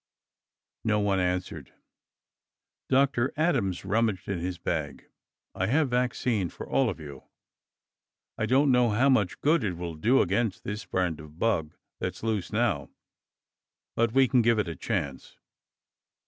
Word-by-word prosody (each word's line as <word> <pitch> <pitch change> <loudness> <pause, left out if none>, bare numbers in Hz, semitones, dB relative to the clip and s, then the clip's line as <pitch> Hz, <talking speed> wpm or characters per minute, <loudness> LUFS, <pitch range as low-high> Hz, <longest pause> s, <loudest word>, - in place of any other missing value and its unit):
No 110 -1 +2
one 100 -2 +1
answered. 90 -6 -2 1.2
Dr. 130 -1 +2
Adams 125 - 0
rummaged 105 -1 0
in 100 -3 -2
his 90 +1 -3
bag. 80 -4 -3 0.5
"I 95 - -1
have 140 +2 +2
vaccine 120 -5 0
for - - -9
all 135 -3 +2
of 95 - -5
you. 70 -4 -10 1.1
I - - -1
don't 135 +2 +4
know 125 -1 +4
how 120 +6 +3
much 105 -9 +2
good 150 -2 +3
it 95 -4 -1
will 85 -1 -5
do 115 +12 +3
against 115 -6 -1
this 105 +2 -5
brand 90 -4 -1
of 75 0 -13
bug 80 -8 0 0.2
that's - - -4
loose 110 -5 -1
now, 105 - 0 1.1
but 115 -1 +2
we 135 +2 +4
can 125 0 +3
give 115 0 +3
it 105 - 0
a 85 - -4
chance." 70 0 -4
105 Hz, 145 wpm, -27 LUFS, 90-125 Hz, 1.2 s, don't